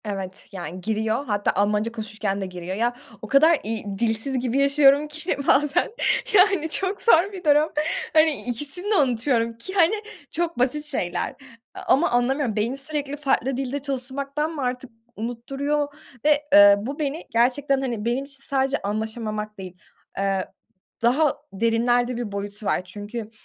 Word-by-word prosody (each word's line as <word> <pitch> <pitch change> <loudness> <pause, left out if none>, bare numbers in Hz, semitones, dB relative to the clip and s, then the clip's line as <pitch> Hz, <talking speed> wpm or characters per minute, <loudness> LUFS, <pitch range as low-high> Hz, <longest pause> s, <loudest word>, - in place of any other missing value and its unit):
Evet, 195 -2 -6
yani 180 -2 -7
giriyor, 220 +5 -1
hatta 205 -4 0
Almanca 210 +3 +1
konuşurken 215 -3 -3
de - - -2
giriyor. 180 0 -6
Ya, 240 +3 0 0.3
o 215 - -7
kadar, 310 +6 +5
iii, 220 0 -4
dilsiz 235 +3 +1
gibi 250 +2 0
yaşıyorum 280 +1 +5
ki 310 +4 -3
bazen, 295 +5 +3 0.4
yani, 375 -5 +4
çok 385 +4 -1
zor 395 -2 +5
bir 370 -2 -8
durum. 300 0 +4 0.4
Hani, 310 -2 +3
ikisini 295 - -3
de - - +4
unutuyorum, 240 - +1
ki, 375 +11 -8
hani, 370 +1 +4 0.4
çok 340 -3 -2
basit 295 +4 +1
şeyler. 180 -11 -2 0.4
A - - -7
ama 285 +6 +3
anlamıyorum, 245 -1 +1
beyni 230 +5 -1
sürekli 290 0 -3
farklı 270 -3 0
dilde 270 +1 -3
çalışmaktan 275 +3 -3
mı 310 -3 -5
artık 250 0 -3 0.2
unutturuyor, 275 +6 -2 0.4
ve, 300 -1 +4
eee, 205 -3 +9
bu 270 +8 -5
beni 300 +2 -2
gerçekten, 265 +4 +2
hani, 235 -5 -3
benim 245 +4 0
için 275 -1 -9
sadece 270 0 +1
anlaşamamak 215 0 -4
değil, 185 -2 -9 0.4
ııı, 195 -1 0 0.6
daha 265 +5 +3 0.2
derinlerde 235 +3 +1
bir 235 -4 -4
boyutu 200 +1 -5
var, 185 - 0
çünkü, 210 +4 -7
250 Hz, 155 wpm, -24 LUFS, 215-290 Hz, 0.6 s, eee